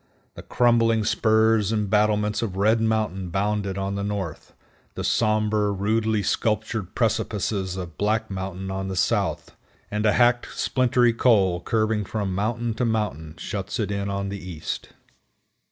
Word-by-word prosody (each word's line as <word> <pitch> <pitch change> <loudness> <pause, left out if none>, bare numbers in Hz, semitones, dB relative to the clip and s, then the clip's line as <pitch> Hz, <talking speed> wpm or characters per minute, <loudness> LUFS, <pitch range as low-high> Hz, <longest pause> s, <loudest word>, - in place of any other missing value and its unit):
The - - -9
crumbling 115 -2 +2
spurs 110 -1 +3
and 105 -2 0
battlements 105 +1 +2
of 105 -5 -3
Red 110 +3 +3
Mountain 110 -5 0
bound 100 +2 -1
it 95 0 -4
on 100 0 -2
the 100 0 -3
north, 100 -6 -5 0.4
the - - -4
somber, 110 -1 +1
rudely 110 +2 0
sculptured 110 -1 -1
precipices 100 -4 -1
of 85 -4 -7
Black 110 +1 0
Mountain 95 0 -5
on 95 0 -3
the 95 - -4
south, - - 0 0.4
and 105 0 -1
a 105 - +4
hacked, 120 0 +2
splintery 125 -2 +2
col, 100 -8 +3
curving 110 +2 0
around 100 - -4
from 100 -4 -2
mountain 115 +4 -1
to 125 - -2
mountain, 100 -9 -2
shuts 100 +1 -4
it 105 -3 -1
in 100 0 -2
on 100 0 -2
the 100 0 -5
east. 85 -4 -5
105 Hz, 155 wpm, -24 LUFS, 95-110 Hz, 0.4 s, a